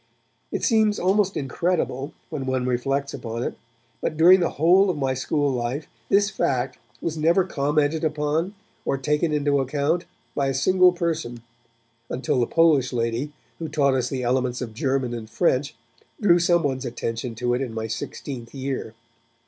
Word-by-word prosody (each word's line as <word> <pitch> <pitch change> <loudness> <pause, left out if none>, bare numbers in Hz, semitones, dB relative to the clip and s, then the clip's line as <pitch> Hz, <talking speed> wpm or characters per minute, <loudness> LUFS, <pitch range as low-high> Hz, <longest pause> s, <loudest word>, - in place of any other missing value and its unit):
It - - -3
seems 220 -3 +3
almost 195 +1 +2
incredible, 145 -1 -1 0.2
when 140 -4 -4
one 130 -1 0
reflects 135 +3 -1
upon 115 0 -4
it, - - -2 0.5
but 155 - -2
during 180 +4 +7
the 170 - +1
whole 180 +6 +5
of 175 - -1
my 135 -2 0
school 145 +2 0
life, 125 +4 -2 0.2
this 200 +1 +3
fact 130 -8 -1 0.2
was 160 -1 -3
never 170 +4 +4
commented 150 -1 0
upon 155 +5 0 0.3
or 135 - 0
taken 150 +4 0
into 145 -1 +2
account 145 +6 0 0.3
by 140 -1 0
a 135 - -1
single 185 +6 +5
person, 160 -9 -3 0.7
until 130 0 0
the 120 - +2
Polish 155 -6 +3
lady 120 +4 -1 0.3
who 165 - -3
taught 140 -3 +2
us 130 -1 0
the 130 -2 -3
elements 125 0 0
of 120 -4 -5
German 130 +1 -1
and 110 -2 -6
French 140 -2 +1 0.4
drew 175 -5 +5
someone's 165 -7 +2
attention 115 -1 -4
to 120 +1 0
it 125 - 0
in 130 -4 -3
my 110 0 -4
sixteenth 115 +3 -6
year. 130 -4 -4
140 Hz, 165 wpm, -24 LUFS, 125-165 Hz, 0.7 s, during